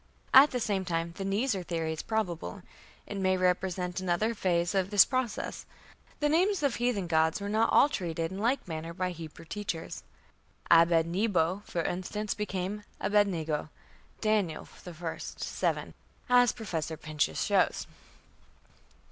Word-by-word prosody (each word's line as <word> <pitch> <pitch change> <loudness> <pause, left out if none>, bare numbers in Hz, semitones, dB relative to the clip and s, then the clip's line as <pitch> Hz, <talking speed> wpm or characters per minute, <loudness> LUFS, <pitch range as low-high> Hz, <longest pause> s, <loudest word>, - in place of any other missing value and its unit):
" - - -33
At 295 - 0
the 250 - -2
same 205 -4 0
time 170 -2 -2
the 195 - -3
"Nisr" 200 0 0
theory 165 -2 -2
is 160 - -5
probable: 200 -3 -3 0.4
it 205 - -6
may 185 -1 +2
represent 180 0 0
another 185 +5 0
phase 175 -4 0
of 190 -1 +1
this 205 -2 +7
process. 255 -4 -3 0.5
The 295 - +3
names 355 +3 +2
of 275 -4 +1
heathen 240 -6 0
gods 160 +1 +2
were 200 - -4
not 220 +2 +2
all - - +6
treated 165 - -3
in 190 - -5
like 240 +3 0
manner 165 0 -5
by 185 0 -1
the - - -5
Hebrew 165 -1 -10
teachers. 190 -3 -5 0.7
Abed 165 -1 +6
nebo, 185 0 +1
for 170 - -2
instance, 200 +5 -2
became 205 0 -3 0.2
Abed 205 0 +3
nego, 160 -4 -2 0.5
Daniel, 210 -8 0 0.2
i, 165 -1 -5
7, - - -3 0.4
as 245 -1 +6
Professor 165 -8 -4
Pinches 150 - -1
shows. - - +2
185 Hz, 150 wpm, -29 LUFS, 165-210 Hz, 0.7 s, this